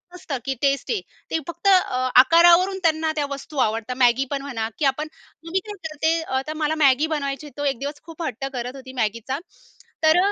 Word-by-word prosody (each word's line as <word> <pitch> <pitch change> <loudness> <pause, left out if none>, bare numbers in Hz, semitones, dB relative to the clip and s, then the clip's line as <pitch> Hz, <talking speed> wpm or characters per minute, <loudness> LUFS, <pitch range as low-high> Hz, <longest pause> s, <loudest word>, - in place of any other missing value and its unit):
नसतं 300 -6 -4
की 270 - 0
टेस्ट 275 -2 +1
आहे. 435 -5 0 0.3
ते - - +1
फक्त, 340 +3 -4 0.5
आकारावरून 345 +6 +5
त्यांना 315 -1 +2
त्या 295 - 0
वस्तू 280 +2 -7
आवडतात. 225 0 0
Maggi 245 +2 +4
पण 280 - -1
म्हणा 235 -6 -3
की 300 - +1
आपण, 275 +3 0 0.4
मी 380 - +2
काय 420 - -6
करते, 310 +1 0 0.4
तर 310 - -3
मला 300 +1 +1
Maggi 275 +3 +4
बनवायची, 290 -1 -3
तो 290 - -3
एक 245 - -9
दिवस 290 +1 -5
खूप 330 0 -8
हट्ट 270 -3 -4
करत 250 +1 -4
होती 260 -1 -10
Maggiचा. 230 +5 -2 0.6
तर, 315 +2 +5
285 Hz, 185 wpm, -23 LUFS, 260-320 Hz, 0.6 s, आकारावरून